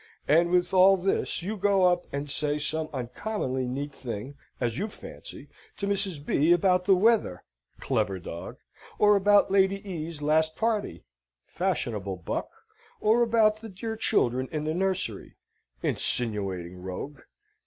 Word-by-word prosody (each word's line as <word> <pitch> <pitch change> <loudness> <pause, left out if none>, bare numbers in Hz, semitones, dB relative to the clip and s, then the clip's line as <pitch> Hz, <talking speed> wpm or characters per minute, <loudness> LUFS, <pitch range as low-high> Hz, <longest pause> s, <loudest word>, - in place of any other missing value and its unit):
And 170 +3 +4
with 180 +1 +1
all 190 +1 +6
this 185 -2 0
you 210 +4 -3
go 195 -2 +3
up 175 0 +1
and 140 +1 -4
say 145 +1 -1
some 155 +1 -2
uncommonly 130 - -3
neat 140 +3 -4
thing 120 +1 -6 0.3
(as 120 -2 -2
you 210 - -1
fancy) 210 - -10 0.3
to 200 - -3
Mrs. 195 -7 0
B. 155 +3 +2
about 180 +1 +3
the 195 - +5
weather 205 - +2 0.4
(clever 110 -7 -1
dog!), 85 -1 -8 0.4
or 210 0 +5
about 200 0 +4
Lady 195 +1 +2
E.'s 165 -3 -5
last 155 +2 +1
party 220 -2 -2 0.4
(fashionable 115 - -2
buck!), 90 - -4 0.5
or 220 +3 +3
about 220 -2 +3
the 225 - -8
dear 220 +4 -5
children 130 - +1
in 155 -1 -3
the 155 +1 -1
nursery 185 - -2 0.5
(insinuating 95 -7 +1
rogue!). 105 +10 -7
170 Hz, 145 wpm, -27 LUFS, 130-195 Hz, 0.5 s, all